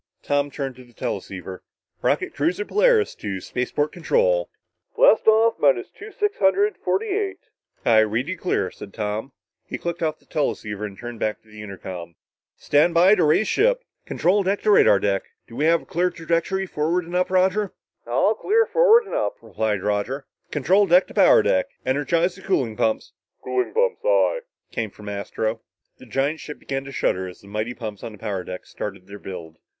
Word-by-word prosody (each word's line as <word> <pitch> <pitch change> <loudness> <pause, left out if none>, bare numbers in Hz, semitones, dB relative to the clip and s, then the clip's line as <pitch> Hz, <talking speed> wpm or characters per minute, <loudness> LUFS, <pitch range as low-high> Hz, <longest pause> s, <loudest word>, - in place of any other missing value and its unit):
Tom 145 0 +1
turned 135 -2 -5
to 130 - -12
the 120 -1 -21
teleceiver. 95 -3 -5 0.4
"Rocket - - 0
cruiser 175 +8 0
Polaris 445 - +3
to 100 -2 -5
spaceport 125 +9 -2
control." - - +1 0.2
"... - - -51
Blast - - +5
off 220 +1 +4
minus 135 -5 +2
two 425 +1 -11
six 415 +1 -1
hundred 405 +8 +3
forty 430 - +1
eight...." 395 0 -1 0.5
"I 110 -2 +6
read 110 +5 +1
you 185 - -2
clear," 185 0 -1
said 100 - -11
Tom. 110 +4 -3 0.3
He - - -6
clicked 170 0 -4
off 155 -1 0
the - - -30
teleceiver 105 -8 -2
and 95 -1 -12
turned 120 -1 -8
back 110 - -2
to 110 - -24
the 105 0 -11
intercom. 90 -4 -8 0.4
"Stand 155 +4 +2
by 180 +4 +7
to 180 - +3
raise 155 +8 +3
ship! - - +2 0.2
Control 195 +4 +2
deck 195 +1 -1
to 215 - +4
radar 105 - +6
deck. 100 0 0 0.3
Do 115 - -12
we 145 +5 0
have 165 0 +2
clear 180 +2 +1
trajectory 170 +3 -1
forward 170 +1 -1
and 175 - -10
up, 180 0 +2
Roger?" 190 +2 +2 0.4
"All 130 - +2
clear 440 - +2
forward 475 -1 +5
and - - -9
up," 105 - -1
replied 110 -2 -2
Roger. 105 +7 -1 0.2
"Control 185 +8 +3
deck 180 +2 +5
to - - -11
power - - +6
deck... 95 - +2 0.2
energize 165 +7 +1
the 190 - -14
cooling 130 - 0
pumps!" 110 +1 -1 0.3
"Cooling 125 0 -1
pumps, 485 +1 +1
aye," - - +3 0.3
came 110 -2 -2
from 105 +1 -13
Astro. 110 +3 -3 0.4
The 130 - -14
giant 135 +7 -1
ship 150 - -8
began 135 0 -4
to 135 - -8
shudder 95 -8 0
as 90 - -11
the 100 - -16
mighty 110 +4 -3
pumps 110 -4 -7
on 110 - -6
the - - -12
power 100 -3 -3
deck 90 0 -7
started 100 -3 -7
their 100 +1 -10
build. 85 -4 -8
145 Hz, 190 wpm, -23 LUFS, -, 0.5 s, by